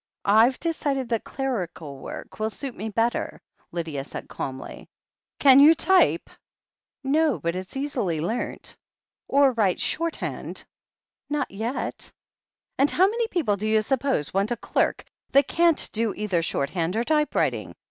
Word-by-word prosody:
"I've 225 Hz, +5 st, +5 dB
decided 285 Hz, -6 st, -1 dB
that 230 Hz, -2 st, -1 dB
clerical 180 Hz, -, -4 dB
work -, -, -9 dB
will 215 Hz, 0 st, 0 dB
suit 255 Hz, +4 st, -7 dB
me 220 Hz, -, -4 dB
better," 230 Hz, +3 st, -1 dB, 0.3 s
Lydia 160 Hz, -5 st, -3 dB
said -, -, -8 dB
calmly. 130 Hz, -1 st, -7 dB, 0.5 s
"Can 270 Hz, -1 st, +7 dB
you 305 Hz, +3 st, +8 dB
type 375 Hz, +3 st, +3 dB, 0.4 s
?" -, -, -69 dB, 0.3 s
"No, 295 Hz, 0 st, +2 dB
but 170 Hz, +1 st, -2 dB
it's 185 Hz, +7 st, -6 dB
easily 245 Hz, -, -1 dB
learnt." 220 Hz, +10 st, -3 dB, 0.5 s
"Or 280 Hz, -1 st, +5 dB
write 210 Hz, -7 st, +1 dB
shorthand 335 Hz, 0 st, -3 dB, 0.3 s
?" -, -, -66 dB
"Not 295 Hz, -1 st, -1 dB
yet." 225 Hz, +6 st, -3 dB, 0.7 s
"And 280 Hz, +2 st, +5 dB
how 370 Hz, -, +4 dB
many 460 Hz, +2 st, -1 dB
people, 295 Hz, -, 0 dB
do 215 Hz, +2 st, -3 dB
you 215 Hz, 0 st, +3 dB
suppose, 255 Hz, -, 0 dB
want 195 Hz, +2 st, +1 dB
a 240 Hz, -, 0 dB
derk -, -, 0 dB, 0.3 s
that 275 Hz, +1 st, +5 dB
can't 335 Hz, -2 st, +3 dB
do 220 Hz, -1 st, 0 dB
either 195 Hz, -5 st, 0 dB
shorthand 165 Hz, +3 st, -1 dB
or 230 Hz, -, +1 dB
typewriting?" 300 Hz, +2 st, 0 dB
235 Hz, 145 wpm, -25 LUFS, 195-285 Hz, 0.7 s, you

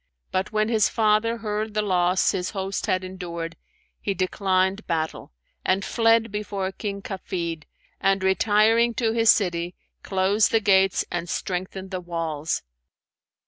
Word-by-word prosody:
But 185 Hz, +2 st, -1 dB
when 215 Hz, 0 st, +1 dB
his 220 Hz, -2 st, +3 dB
father 220 Hz, +1 st, +2 dB
heard 215 Hz, -1 st, -3 dB
the 215 Hz, -, +1 dB
loss 180 Hz, -2 st, +2 dB
his 185 Hz, -2 st, -2 dB
host 195 Hz, 0 st, -2 dB
had 185 Hz, 0 st, +1 dB
endured, 170 Hz, -3 st, -6 dB, 0.4 s
he 200 Hz, -, -2 dB
declined 190 Hz, +2 st, 0 dB
battle, 160 Hz, -2 st, -2 dB, 0.3 s
and 190 Hz, +1 st, +1 dB
fled 225 Hz, -1 st, +3 dB
before 200 Hz, -2 st, -3 dB
King 200 Hz, 0 st, -5 dB
Kafid, 170 Hz, -5 st, -4 dB, 0.3 s
and 195 Hz, 0 st, +2 dB
retiring 220 Hz, +4 st, +3 dB
to 230 Hz, -3 st, +1 dB
his 225 Hz, 0 st, +3 dB
city, 175 Hz, -4 st, +2 dB, 0.3 s
closed 195 Hz, +2 st, +2 dB
the 225 Hz, -, +3 dB
gates 195 Hz, -2 st, +3 dB
and 175 Hz, 0 st, -3 dB
strengthened 185 Hz, +1 st, -4 dB
the 185 Hz, -1 st, -3 dB
walls. 165 Hz, -3 st, -3 dB
195 Hz, 140 wpm, -24 LUFS, 180-215 Hz, 0.4 s, his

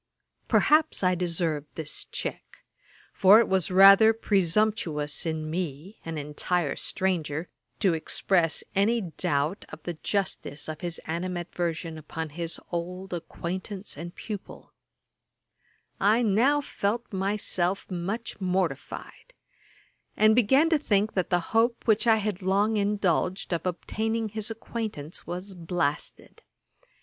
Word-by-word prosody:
Perhaps 310 Hz, -6 st, +3 dB
I 185 Hz, 0 st, +4 dB
deserved 170 Hz, -4 st, -1 dB
this 155 Hz, -2 st, -4 dB
check; -, -, -6 dB, 0.5 s
for 200 Hz, +2 st, +7 dB
it 230 Hz, -, +3 dB
was 190 Hz, -3 st, +2 dB
rather 195 Hz, +4 st, +8 dB
presumptuous 185 Hz, -7 st, 0 dB
in 160 Hz, -1 st, -2 dB
me, 165 Hz, +3 st, -4 dB
an 165 Hz, -1 st, -5 dB
entire 150 Hz, +1 st, -1 dB
stranger, 170 Hz, -4 st, -2 dB, 0.3 s
to 190 Hz, -5 st, +4 dB
express 165 Hz, +1 st, +1 dB
any 225 Hz, +4 st, +3 dB
doubt 155 Hz, 0 st, -1 dB
of -, -, -11 dB
the 175 Hz, -, -3 dB
justice 165 Hz, -4 st, -2 dB
of 155 Hz, -1 st, -6 dB
his 175 Hz, -2 st, -3 dB
animadversion 170 Hz, -1 st, -3 dB
upon 160 Hz, +1 st, -6 dB
his 170 Hz, +2 st, -4 dB
old 180 Hz, +2 st, -4 dB
acquaintance 185 Hz, +4 st, -5 dB
and 170 Hz, +4 st, -8 dB
pupil. 210 Hz, -3 st, -8 dB, 1.3 s
I 215 Hz, +5 st, +4 dB
now 240 Hz, +8 st, +3 dB
felt 230 Hz, -3 st, -3 dB
myself 195 Hz, -1 st, -1 dB
much 195 Hz, +5 st, -4 dB
mortified, 185 Hz, -, -3 dB, 0.8 s
and 215 Hz, 0 st, +6 dB
began 265 Hz, +7 st, +4 dB
to 320 Hz, -, +4 dB
think 210 Hz, -6 st, +1 dB
that 185 Hz, -2 st, -1 dB
the 175 Hz, -2 st, 0 dB
hope 230 Hz, +1 st, +2 dB
which 220 Hz, +1 st, +3 dB
I 225 Hz, -, +7 dB
had 210 Hz, -3 st, -2 dB
long 200 Hz, +4 st, +2 dB
indulged 200 Hz, -3 st, 0 dB
of 170 Hz, +2 st, -2 dB
obtaining 220 Hz, +5 st, -2 dB
his 215 Hz, +1 st, -3 dB
acquaintance 220 Hz, -8 st, -5 dB
was 185 Hz, +3 st, -5 dB
blasted. 165 Hz, -4 st, -3 dB
185 Hz, 120 wpm, -27 LUFS, 165-210 Hz, 1.3 s, rather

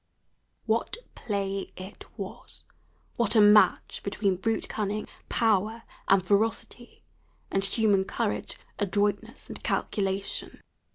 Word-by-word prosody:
What 225 Hz, -, 0 dB, 0.2 s
play 195 Hz, -3 st, -3 dB
it 185 Hz, +2 st, -9 dB
was! -, -, -7 dB, 0.5 s
what 235 Hz, -1 st, +2 dB
a -, -, +7 dB
match 210 Hz, 0 st, +5 dB
between 200 Hz, -1 st, 0 dB
brute 225 Hz, +5 st, -1 dB
cunning, 210 Hz, 0 st, -2 dB, 0.2 s
power, 220 Hz, 0 st, +1 dB, 0.2 s
and 190 Hz, -2 st, +4 dB
ferocity, 220 Hz, +4 st, -1 dB, 0.5 s
and 195 Hz, -, +1 dB
human 200 Hz, -1 st, +3 dB
courage, -, -, -2 dB, 0.2 s
adroitness, 205 Hz, +4 st, -1 dB
and -, -, -7 dB
calculation! 195 Hz, -1 st, -2 dB
205 Hz, 105 wpm, -28 LUFS, 195-220 Hz, 0.5 s, a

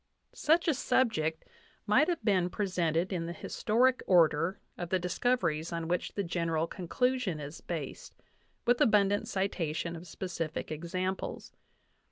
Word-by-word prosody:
Such 330 Hz, +3 st, +2 dB
a 320 Hz, -, +4 dB
subject 160 Hz, -, +1 dB, 0.4 s
might 235 Hz, +9 st, +4 dB
have 340 Hz, -11 st, -2 dB
been 185 Hz, -4 st, +3 dB
presented 180 Hz, -3 st, 0 dB
in 165 Hz, -2 st, -2 dB
the 170 Hz, -, -4 dB
historic 245 Hz, +9 st, +1 dB
order 170 Hz, 0 st, +4 dB, 0.2 s
of 175 Hz, -1 st, -5 dB
the 185 Hz, -, +2 dB
discoveries 180 Hz, -3 st, 0 dB
on 165 Hz, -1 st, -3 dB
which 175 Hz, +1 st, -2 dB
the 200 Hz, -, 0 dB
general 165 Hz, -2 st, 0 dB
conclusion 200 Hz, +1 st, -1 dB
is 145 Hz, +2 st, -8 dB
based, 155 Hz, -6 st, -6 dB, 0.5 s
with 245 Hz, +2 st, +3 dB
abundant 205 Hz, -4 st, +3 dB
citation 170 Hz, -6 st, -2 dB
of 170 Hz, +2 st, -9 dB
specific 165 Hz, -3 st, -4 dB
exam 185 Hz, +4 st, -2 dB
ples. -, -, -7 dB
180 Hz, 140 wpm, -31 LUFS, 165-210 Hz, 0.5 s, a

